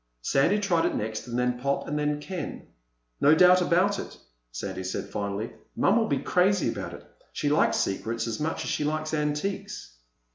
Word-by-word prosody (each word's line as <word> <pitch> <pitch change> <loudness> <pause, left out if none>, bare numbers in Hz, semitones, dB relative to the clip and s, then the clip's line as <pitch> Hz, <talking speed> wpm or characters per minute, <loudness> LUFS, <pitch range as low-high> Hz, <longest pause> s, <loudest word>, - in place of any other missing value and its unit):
Sandy 140 - +3
tried 180 -5 +2
it - - -2
next, 110 +2 -3
and 120 0 -3
then 125 0 0
Pop 140 +2 -1
and 150 +1 -1
then 150 0 0
Ken. 175 +1 -6 0.5
"No 150 +2 +6
doubt 180 +2 +6
about 185 +3 +2
it," - - -7 0.3
Sandy - - -5
said 95 - -4
finally. 100 +2 -3 0.2
"Mom'll 220 +3 +3
be 140 - +1
crazy 185 +5 +2
about - - -5
it. - - -13 0.3
She 145 - -1
likes 150 - +3
secrets 115 +4 -1
as 115 -2 -3
much 160 +2 -2
as - - -3
she - - -1
likes 155 +1 -2
antiques." 155 - -3
150 Hz, 180 wpm, -27 LUFS, 125-180 Hz, 0.5 s, No